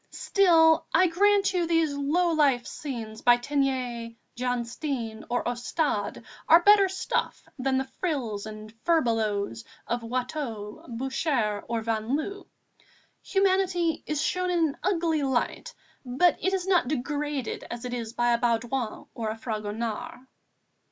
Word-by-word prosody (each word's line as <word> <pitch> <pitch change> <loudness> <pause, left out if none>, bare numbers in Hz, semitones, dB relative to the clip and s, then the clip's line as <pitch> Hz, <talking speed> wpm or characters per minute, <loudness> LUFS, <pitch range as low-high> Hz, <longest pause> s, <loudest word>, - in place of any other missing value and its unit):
Still, 325 -5 +4
I 365 - +6
grant 400 +3 +3
you 350 -2 +1
these 330 -3 +2
low 310 +5 +1
life 280 -6 +3
scenes 230 -6 -6
by 240 0 +6
Teniers, 250 -3 -2 0.2
Jan 245 -1 -1
Steen 230 -4 -4
or 245 0 -1
Ostade 245 -1 -1 0.3
are 335 +2 +7
better 405 -1 +6
stuff 380 - -2
than 260 0 +1
the 265 0 -1
frills 235 - -2
and 215 0 -9
furbelows 220 - +1 0.2
of 240 0 -2
Watteau, 240 -3 -4
Boucher, 245 -3 -1
or 230 -1 -1
Van 225 +3 -1
Loo; 395 +6 -6 0.7
humanity 375 -4 +1
is 305 -2 -1
shown 365 0 0
in 335 -3 +2
an 280 - -8
ugly 335 -4 +1
light, 270 - -1 0.3
but 265 +8 +3
it 380 - +1
is 380 -2 -1
not 365 -8 +3
degraded 290 -1 -2
as 235 +1 -6
it 245 - -4
is 230 -2 -4
by 240 0 +2
a 235 - +1
Baudouin 235 0 -1
or 225 -2 -3
a 220 - -4
Fragonard." 220 0 -4
265 Hz, 140 wpm, -27 LUFS, 230-330 Hz, 0.7 s, are